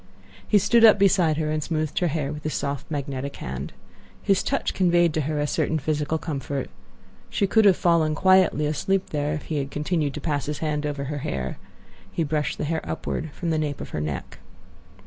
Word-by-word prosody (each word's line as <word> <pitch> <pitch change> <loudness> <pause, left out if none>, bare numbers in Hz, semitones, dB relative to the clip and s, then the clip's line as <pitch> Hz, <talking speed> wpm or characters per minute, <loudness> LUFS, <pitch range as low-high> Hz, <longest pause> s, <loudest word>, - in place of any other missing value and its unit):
He 210 - +5
stood 205 +4 +4
up 220 -2 +9
beside 180 -6 +3
her 155 -1 -1
and 155 0 -1
smoothed 155 -1 -1
her 180 - +2
hair 150 -2 -2
with 150 - -7
his 155 0 -3
soft, 140 -1 -3
magnetic 140 -2 -4
hand. 65 0 -5 0.5
His 195 -1 +3
touch - - -1
conveyed 175 -3 +3
to 155 - 0
her 150 +1 -2
a 145 - +1
certain 160 +2 0
physical 150 +1 -1
comfort. 140 -4 -4 0.6
She 200 - +1
could 220 +2 +4
have 195 -3 +6
fallen 165 -3 +2
quietly 185 -3 +4
asleep 185 +6 0
there 150 0 -1
if 150 - -6
he 155 - -3
had 140 -1 -2
continued 150 -1 -1
to - - -4
pass 145 -3 -2
his 150 -1 -2
hand 150 -1 -1
over 145 -1 -3
her 145 +1 -4
hair. 65 - -4 0.5
He 165 - -1
brushed 150 -3 -1
the - - -3
hair 160 +1 -1
upward 160 - -4
from 170 -2 -3
the 155 - +1
nape 150 -2 -2
of - - -7
her 75 - -3
neck. 75 -3 -5
155 Hz, 205 wpm, -24 LUFS, 145-170 Hz, 0.6 s, up